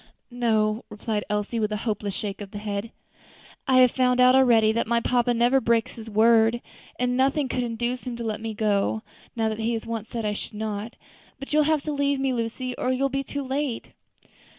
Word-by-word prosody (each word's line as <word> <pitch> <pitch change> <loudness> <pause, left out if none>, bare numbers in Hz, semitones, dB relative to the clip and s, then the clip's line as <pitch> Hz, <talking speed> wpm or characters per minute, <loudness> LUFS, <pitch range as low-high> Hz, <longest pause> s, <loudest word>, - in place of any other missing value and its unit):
"No," 220 -2 +1
replied 210 0 -3
Elsie, 210 +2 -1
with 215 -1 0
a 210 - -1
hopeless 205 -3 -2
shake 205 -1 -4
of 200 - -7
the 205 - -8
head, 205 +1 -4 0.8
"I 260 -1 +5
have 250 -1 +6
found 250 -1 +2
out 250 0 +7
already 235 -5 +5
that 230 0 -1
my 235 0 +2
papa 245 +1 +1
never 240 +3 +3
breaks 230 -1 +1
his 225 -1 -9
word; 225 +2 +4 0.4
and 250 0 0
nothing 270 +2 +2
could 255 - -2
induce 240 +1 -2
him 245 -2 -4
to 235 - -6
let 220 -1 -3
me 220 -1 -4
go, 210 0 0 0.3
now 225 -1 0
that 220 0 -3
he 225 +1 0
has 225 - -3
once 225 -1 -5
said 230 -2 -4
I 210 - 0
should 210 - -7
not. 215 +1 -4 0.4
But 275 +2 -7
you 305 - +4
will 300 - +4
have 310 -2 +1
to 305 - -3
leave 280 -1 0
me, 270 -1 0
Lucy, 245 +2 -3
or 255 - 0
you 260 +1 0
will 275 - +2
be 275 +1 -2
too 285 +1 -5
late." 265 -2 -3
235 Hz, 220 wpm, -25 LUFS, 220-255 Hz, 0.8 s, out